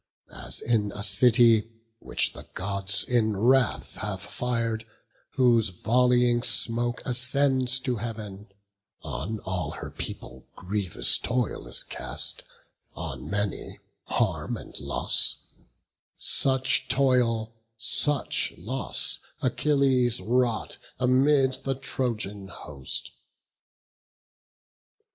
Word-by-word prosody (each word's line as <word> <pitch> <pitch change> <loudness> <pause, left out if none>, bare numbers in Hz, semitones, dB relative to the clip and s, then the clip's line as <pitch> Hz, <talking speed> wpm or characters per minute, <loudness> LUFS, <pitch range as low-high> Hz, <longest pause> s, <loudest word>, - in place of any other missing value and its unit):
As - - -5
in 110 -3 +1
a 105 - -3
city, 115 +1 +4 0.3
which - - -1
the - - -12
Gods 100 0 +2
in 110 -4 0
wrath 125 +3 +1
Have 100 -3 -5
fir'd, 115 0 -2 0.5
whose 120 -5 +3
volleying 120 +5 +2
smoke 120 0 +1
ascends 130 0 +2
to 125 -2 -2
Heav'n, 105 -3 -7 0.6
On 110 +3 -4
all 95 -1 -3
her - - -8
people 65 - -7
grievous 95 -1 +2
toil 125 -2 -2
is - - -1
cast, - - +1 0.5
On - - -6
many, 100 0 -3 0.3
harm - - -1
and - - -12
loss; - - +2 0.8
such 135 0 +1
toil, 120 -5 +1 0.2
such 140 +4 +2
loss 125 +9 -2 0.2
Achilles 130 -2 +2
wrought 115 +3 -1 0.2
amid 130 +1 +3
the 135 -1 -1
Trojan 110 -7 -3
host. 70 -8 -3
120 Hz, 95 wpm, -26 LUFS, 105-130 Hz, 0.8 s, city